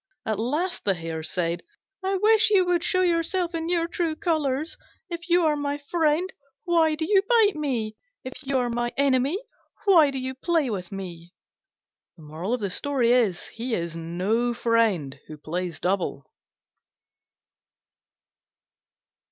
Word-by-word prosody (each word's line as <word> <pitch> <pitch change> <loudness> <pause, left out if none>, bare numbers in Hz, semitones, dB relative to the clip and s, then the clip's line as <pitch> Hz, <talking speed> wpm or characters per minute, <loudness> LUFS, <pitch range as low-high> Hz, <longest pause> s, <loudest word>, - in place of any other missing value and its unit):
At 215 -2 -1
last 305 +11 -1
the 195 -2 +2
Hare 165 -1 -5
said, 170 +1 -1 0.4
"I 385 +1 0
wish 435 +2 +5
you 390 -3 +4
would 355 -1 +1
show 370 +1 +2
yourself 345 +1 +1
in 330 0 -3
your 335 -1 +1
true 335 -2 -1
colours! 310 -4 -1 0.4
If 340 +2 -6
you 345 0 +4
are 305 -1 +3
my 290 0 -2
friend, 315 +3 +1 0.4
why 330 -3 +3
do 315 +1 -2
you 390 +2 +4
bite 425 -2 +3
me? 240 -8 -2 0.3
If 260 - -6
you 275 -1 -1
are 245 -1 0
my 240 0 -1
enemy, 275 +3 +2 0.5
why 335 -7 +6
do 275 - -4
you 260 0 -3
play 300 -1 0
with 180 -4 -5
me?" 175 -3 -8 0.8
He 225 - 0
is 170 -1 -4
no 190 +9 -1
friend 215 - +1
who 155 - -9
plays 170 +1 -4
double. 180 -7 -1
260 Hz, 135 wpm, -25 LUFS, -, 0.8 s, why